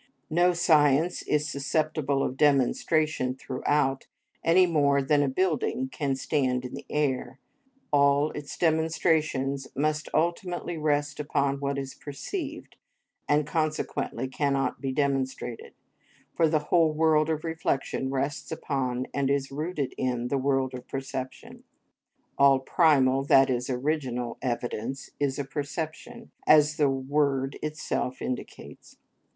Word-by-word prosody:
No 175 +2 +4
science 160 -1 +3
is 150 0 0
susceptible 140 0 0
of 130 - -2
demonstration 145 0 +2
throughout 135 +1 -1 0.4
any 180 +3 +5
more 145 -5 +3
than 145 +2 +2
a 145 - +2
building 150 -4 0
can 140 0 -2
stand 130 -2 0
in 125 - -7
the 135 - -8
air; 130 -3 -1 0.6
all 140 +1 +4
its 145 -1 -7
demonstrations 155 -4 +1
must 155 +2 -1
ultimately 175 +2 -1
rest 145 -2 0
upon 140 -2 0
what 140 0 -2
is 135 -1 -4
perceived, 295 - -6 0.5
and 145 0 +3
consequently 155 -5 -2
cannot 135 -1 -1
be 135 -1 -2
demonstrated, 130 -4 -2 0.6
for 165 -2 +3
the 150 -1 -1
whole 165 -3 +5
world 155 0 +3
of 155 -1 -1
reflection 160 -5 -2
rests 140 +2 -3
upon 130 -5 -2
and 140 -1 0
is 140 -1 0
rooted 150 -1 -3
in 125 -1 -1
the 140 - +1
world 135 -1 0
of 125 0 -8
perception. 135 -1 -6 0.8
All 140 -1 +6
primal, 135 -2 +3
that 135 -1 +5
is, 125 0 -2
original, 125 -3 -2
evidence 120 +1 -3
is 140 -2 0
a 140 - -2
perception, 155 - -6 0.2
as 150 0 +5
the 145 -2 +3
word 135 0 0
itself 150 -4 -3
indicates. 125 - -7
140 Hz, 125 wpm, -27 LUFS, 135-155 Hz, 0.8 s, All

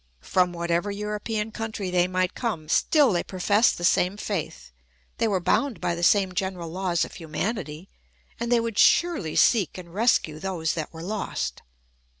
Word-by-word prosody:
From 180 -1 +2
whatever 170 +2 -1
European 210 +1 -3
country 220 -4 -4
they 180 0 +3
might 185 0 0
come, 200 -11 -3
still 290 -8 +4
they 175 - +1
professed 200 +4 +2
the 175 - -7
same 180 +2 +2
faith, 145 - -5 0.5
they - - +2
were 200 -3 +1
bound 260 +7 0
by 175 - -1
the 170 - -5
same 190 +1 +4
general 185 -3 -3
laws 180 -1 0
of - - -12
humanity, 170 0 -4 0.5
and 235 +1 -3
they 240 - +5
would 230 -2 -2
surely 330 - +3
seek 210 -8 +3
and 170 -2 -10
rescue 195 -8 +1
those 170 -3 -2
that 155 -3 -4
were 160 0 -9
lost. 175 - -3
185 Hz, 165 wpm, -25 LUFS, 170-215 Hz, 0.5 s, they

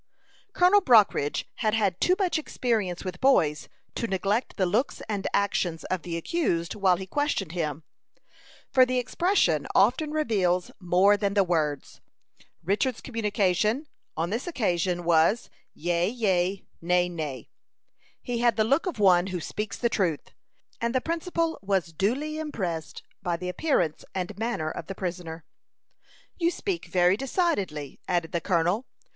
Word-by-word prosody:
Colonel 365 +3 +5
Brockridge 215 - +4
had 215 -1 +1
had 200 -5 0
too 365 - +4
much 370 -5 +1
experience 215 - -2
with 180 -1 -6
boys 155 - +3 0.2
to 230 - -2
neglect 200 +4 -1
the 190 - +2
looks 215 +10 -1
and 205 -3 -2
actions 180 -5 0
of 185 -2 0
the 170 +1 -4
accused 170 - -1
while 195 -3 +3
he 190 - -6
questioned 215 - -1
him, 155 -3 -3 0.9
for 260 - +6
the 255 0 +1
expression 250 - +1
often 250 +10 +3
reveals 200 - 0
more 185 +3 +4
than 200 0 -1
the 200 - +5
words. 155 -5 -2 0.6
Richard's 215 - 0
communication, 215 - 0 0.3
on 165 +3 -1
this 235 - -3
occasion, 180 - 0
was 170 +6 +2 0.2
"yea, 175 +2 0
yea; 195 -5 0 0.2
nay, 180 +1 +2
nay." 155 -8 -6 0.7
He 240 -1 -2
had 235 -2 +3
the 215 - +3
look 275 - +1
of 360 - -3
one 185 -3 +4
who 185 -2 -3
speaks 210 +5 -4
the 240 - +1
truth, 180 -9 -1 0.5
and 235 +2 -1
the - - +4
principal 330 +2 -2
was 190 -4 -1
duly 275 - -1
impressed 185 - -4 0.2
by 175 -3 -1
the 180 +1 -4
appearance 180 - 0
and 185 +2 -3
manner 225 -9 -1
of 165 - -7
the 195 - -6
prisoner. 170 -3 -5 0.9
"You 340 -1 +3
speak 365 0 -3
very 180 0 +3
decidedly," 205 - -2
added 175 -2 0
the 170 -2 -1
colonel. 180 +7 +1
195 Hz, 150 wpm, -26 LUFS, 175-245 Hz, 0.9 s, for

